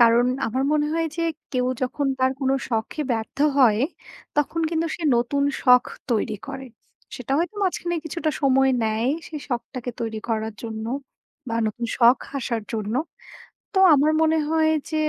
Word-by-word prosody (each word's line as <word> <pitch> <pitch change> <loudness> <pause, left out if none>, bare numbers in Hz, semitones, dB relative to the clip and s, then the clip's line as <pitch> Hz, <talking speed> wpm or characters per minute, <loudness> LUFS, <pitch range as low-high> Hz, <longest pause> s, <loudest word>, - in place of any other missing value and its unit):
কারণ 235 +1 +6 0.2
আমার 255 +4 -1
মনে 300 -1 +2
হয় 330 0 0
যে 335 - -1 0.3
কেউ 250 -1 +1 0.2
যখন 275 +2 -1
তার 260 0 +3
কোনো 270 0 +2
শখে 225 +6 -2
ব্যর্থ 225 -1 -4 0.2
হয়, 230 -5 +5 0.6
তখন 315 +3 +1
কিন্তু 330 0 0
সে 345 - -9
নতুন 265 +4 +1 0.2
শখ 250 -1 +6 0.3
তৈরি 220 -1 0
করে। 270 -1 -6 0.5
সেটা 250 +1 -4
হয়তো 355 +5 -1
মাঝখানে 350 -2 -1
কিছুটা 320 0 -2
সময় 270 -1 +4
নেয়। 220 +3 0 0.2
সেই 305 -2 -6
শখটাকে 245 0 -4
তৈরি 225 -1 -3
করার 220 -1 -1
জন্য 220 -1 -5 0.6
বা 230 - -2
নতুন 235 +2 -3
শখ 240 +1 +6 0.2
আসার 235 -3 -2
জন্য। 215 0 -2 0.8
তো 385 - 0 0.2
আমার 295 +2 +4
মনে 320 0 +3
হয় 320 -1 +3 0.2
যে, 315 - -3
260 Hz, 160 wpm, -23 LUFS, 230-305 Hz, 0.8 s, কারণ